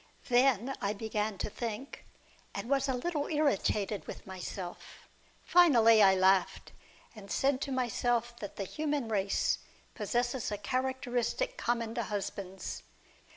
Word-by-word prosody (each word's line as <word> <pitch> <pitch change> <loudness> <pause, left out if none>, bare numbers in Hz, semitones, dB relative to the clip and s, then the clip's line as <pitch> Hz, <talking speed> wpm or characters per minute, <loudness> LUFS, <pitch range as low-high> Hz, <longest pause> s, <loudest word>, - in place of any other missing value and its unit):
Then 250 0 +3
I 200 0 0
began 215 -1 -2
to - - -2
think, 235 +4 -5 0.5
and - - -4
was 275 +1 +1
a 260 - +1
little 295 +3 -2
irritated 215 -9 0
with - - -8
myself. 185 -1 -8 0.4
Finally 235 -11 +6
I 190 -1 +7
laughed, 190 0 +2 0.4
and 200 -2 -11
said 270 -1 +1
to 275 - -3
myself 240 -2 0
that 205 - -7
the 200 - -3
human 290 +2 -2
race 200 -2 +1 0.3
possesses 245 -1 -1
a 205 - -2
characteristic 260 - -1
common 235 - -1
to 235 - -1
husbands. 195 -2 -5
235 Hz, 130 wpm, -31 LUFS, 205-265 Hz, 0.5 s, I